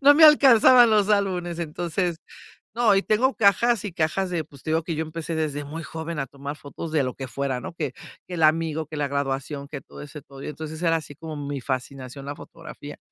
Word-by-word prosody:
no 285 +1 +7
me 320 - +5
alcanzaban 255 -5 +8
los 210 -2 +3
álbumes, 185 -5 0
entonces, 170 +1 -2 0.6
¿no?, 230 -4 +4
y 195 - +3
tengo 250 +5 +2
cajas 220 +2 +3
y 205 - -4
cajas 170 +3 0
de, 170 -3 -1
pues, 140 -2 -16
te - - -5
digo 160 +1 +1
que 165 -1 -3
yo 160 - -1
empecé 160 +1 -5
desde 150 -2 -2
muy 160 +3 -6
joven 160 +1 -5
a 135 - -1
tomar 140 +2 -7
fotos 150 +2 -8
de 150 -3 +2
lo 125 - -2
que 135 - -6
fuera, 135 -1 -2
¿no?, 165 - -7
que 150 -6 -3 0.3
que 180 - -5
el 165 - 0
amigo, 160 0 +2
que 155 - -9
la 145 -1 0
graduación, 140 0 -3
que 145 -2 -7
todo - - -12
ese 145 0 -9
todo, 135 -1 -13
y - - -5
entonces 155 +1 -6
era 165 -1 +3
así 145 -3 -9
como 160 0 -7
mi 145 -1 -4
fascinación 130 +1 -5
la 145 +1 -5
fotografía, - - -11
160 Hz, 230 wpm, -24 LUFS, 140-180 Hz, 0.6 s, alcanzaban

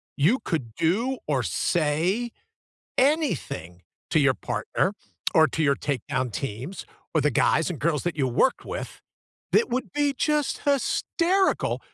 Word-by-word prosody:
You 175 - +3
could 135 - -3
do 220 +11 +1
or 135 -4 +1
say 165 - 0 0.7
anything 255 - 0 0.3
to 155 - +4
your 140 -2 +4
partner, 110 - -1 0.4
or 160 0 +7
to 160 - -2
your 140 -2 +3
takedown 130 -3 -2
teams, 135 - -5 0.3
or 155 - +3
the 150 - +3
guys 160 +5 +2
and 175 - -4
girls 150 +3 0
that 175 - -2
you 135 -3 +2
worked 130 - +1
with - - -6 0.5
that 455 - +3
would 255 +1 -2
be 290 -1 +1
just 300 0 0
hysterical, 370 +4 +1
165 Hz, 140 wpm, -25 LUFS, -, 0.7 s, or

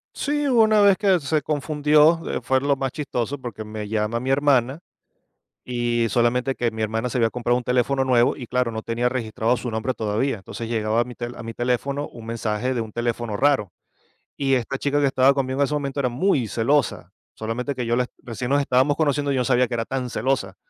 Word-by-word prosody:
Sí, 295 0 -1
hubo 240 -4 +5
una 215 -1 +4
vez 200 -2 +5
que 195 -3 +3
se 150 +1 0
confundió, 150 +2 +3 0.2
fue 130 0 +1
lo 140 +1 +1
más 135 -1 -3
chistoso 140 -2 -3
porque 120 -4 -7
me 105 -1 -6
llama 110 +2 -1
mi 130 +2 -4
hermana, 135 -1 +2 0.8
y 120 -1 0
solamente 125 +3 +1
que 120 -1 -1
mi 110 0 -6
hermana 110 +3 -1
se 130 - -2
había 115 -2 +3
comprado 120 +1 0
un 125 - -4
teléfono 125 +2 +1
nuevo 125 -2 +3
y 125 - -8
claro, 125 -1 0
no 110 0 -4
tenía 115 +2 -1
registrado 120 -1 0
su 120 0 -4
nombre 110 +4 -2
todavía. 110 +4 -1
Entonces 115 +4 -7
llegaba 110 0 0
a - - +2
mi 125 0 -10
tel 120 0 -6
a 115 - -8
mi 115 0 -6
teléfono 130 +4 -1
un 115 -2 -11
mensaje 115 +2 -2
de 120 - -1
un 110 - -6
teléfono 120 -2 -2
raro. 135 -9 +2 0.6
Y 135 -1 +1
esta 130 +2 -2
chica 145 0 +1
que 145 - +3
estaba 135 0 +4
conmigo 135 0 -2
en 140 - +4
ese 150 - -4
momento 140 -1 -3
era 125 -3 +1
muy 130 - +1
celosa, 125 +7 0 0.2
solamente 120 +5 -3
que 125 - -3
yo 120 +1 +1
la 125 0 0 0.2
recién 120 +1 -5
nos 140 +1 +3
estábamos 140 +2 +2
conociendo 145 -2 +1
y - - +1
yo 130 - +1
no 125 - -1
sabía 125 -1 +3
que 125 - -6
era 115 -1 -2
tan 130 -1 -3
celosa. 115 -6 -1
125 Hz, 225 wpm, -23 LUFS, 115-140 Hz, 0.8 s, hubo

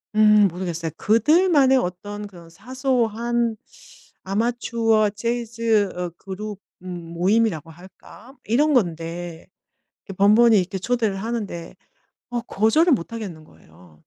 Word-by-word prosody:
음 210 -1 +6
모르겠어요. 170 -2 -4
그들만의 285 - +4
어떤 205 0 -4
그런 175 -4 -15
사소한 235 +1 -1 0.7
아마추어 225 +1 +1
재즈 230 -1 0
어 180 -1 -3
그룹 200 +1 -7 0.2
음 175 -2 -8
모임이라고 185 -2 +1
할까? 190 +8 -16
이런 290 +7 +2
건데 170 -5 -2 0.6
이 - - -3
번번이 215 +3 +5
이렇게 190 +1 -2
초대를 225 -1 -1
하는데 205 -5 -5 0.6
어 240 -1 -2
거절을 255 - +2
못 230 -1 -1
하겠는 185 -9 -7
거예요. 85 - -20
210 Hz, 265 characters per minute, -22 LUFS, 180-235 Hz, 0.7 s, 음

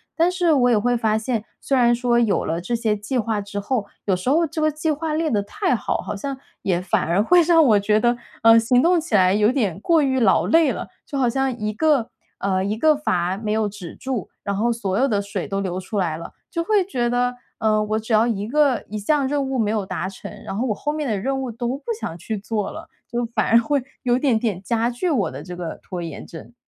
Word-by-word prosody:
但 340 +2 +3
是 355 -3 +2
我 250 -4 +4
也 235 - +4
会 245 +4 +1
发 220 -2 +1
现， 220 0 -2 0.2
虽 275 - 0
然 240 -2 +4
说 240 0 +2
有 225 -4 +1
了 165 +1 -2
这 235 +7 -2
些 225 -2 0
计 210 +5 -3
划 220 -3 0
之 205 0 -5
后， 205 0 -2 0.2
有 195 - +2
时 180 +7 -3
候 325 +5 +3
这 315 +1 -4
个 310 - +3
计 310 +2 -1
划 305 +1 -2
列 320 +1 0
得 210 -3 +2
太 365 - -1
好， 215 - -1
好 - - -5
像 270 +7 -4 0.2
也 180 -3 0
反 180 0 0
而 170 +5 +1
会 355 +9 +5
让 330 -1 +5
我 215 -5 +5
觉 210 +1 +2
得， 240 +1 +2 0.3
呃， 225 0 +8
行 245 +3 +3
动 345 0 +4
起 305 -9 -2
来 185 -1 +5
有 210 +2 +3
点 210 - -1
过 320 +7 +3
于 260 -1 +1
劳 215 -6 +3
累 325 -2 +4
了， - - -5 0.2
就 280 - -5
好 260 -2 +2
像 265 +1 0
一 215 -1 -2
个， 285 -2 +2 0.3
呃， 190 -1 0
一 205 +3 -2
个 310 +5 +4
阀 185 -10 -1
没 215 -1 -3
有 215 0 +1
止 195 -4 -9
住， 260 -7 -4
然 200 - -2
后 230 +4 +1
所 205 -4 -1
有 270 - +3
的 210 -6 +1
水 200 -2 -4
都 195 -1 -2
流 185 -2 -3
出 190 +3 -5
来 175 -5 0
了。 165 - -9 0.2
就 335 -2 -1
会 405 +1 +2
觉 245 -10 -1
得， 245 +1 0 0.2
呃， 215 -1 +2
我 215 +1 -1
只 220 +1 -3
要 220 +2 +4
一 210 -3 -2
个 285 0 +2
一 215 - -4
项 275 +6 +1
任 285 +1 0
务 265 - -1
没 215 -3 +1
有 215 -2 0
达 190 -1 -3
成， 195 - -9
然 - - -5
后 240 +6 -1
我 215 - 0
后 295 +7 -3
面 300 -3 -2
的 215 - 0
任 270 +5 -1
务 255 -2 -4
都 235 +1 -3
不 275 +3 -5
想 165 - -4
去 215 +5 -4
做 210 0 -3
了， - - -9 0.2
就 240 0 -1
反 - - +1
而 230 - +6
会 265 +5 +2 0.2
有 245 -1 +2
点 260 -5 +2
点 215 -5 -2
加 230 +4 0
剧 245 +10 -2
我 250 - +1
的 135 +2 -7
这 180 +3 -8
个 170 -3 -5
拖 180 -2 -6
延 165 -3 -7
症。 165 +8 -11
230 Hz, 275 characters per minute, -22 LUFS, 205-270 Hz, 0.3 s, 呃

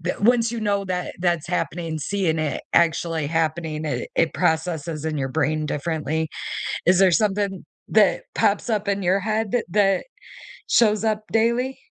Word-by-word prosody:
the 175 +2 -2
once 230 +1 +3
you 235 - -3
know 205 -2 0
that 180 -1 -3
that's 175 -2 0
happening, 165 -2 -2
seeing 165 +1 -1
it 155 -2 -2
actually 165 -2 +2
happening, 160 0 -1
it 150 - -3
it 165 - +2
processes 160 -1 -1
in 155 -2 -2
your 135 -1 -1
brain 155 +2 0
differently. 160 +1 -2 0.6
Is 180 +1 +4
there 190 -1 +6
something 200 0 0 0.2
that 215 -2 +3
pops 205 +3 +1
up 210 -2 0
in 200 0 0
your 185 +3 +2
head 215 +1 -1
that 245 - +1
that 195 -1 +3 0.7
shows 215 -2 +4
up 215 -1 0
daily? 235 +4 +1
180 Hz, 160 wpm, -23 LUFS, 160-205 Hz, 0.7 s, there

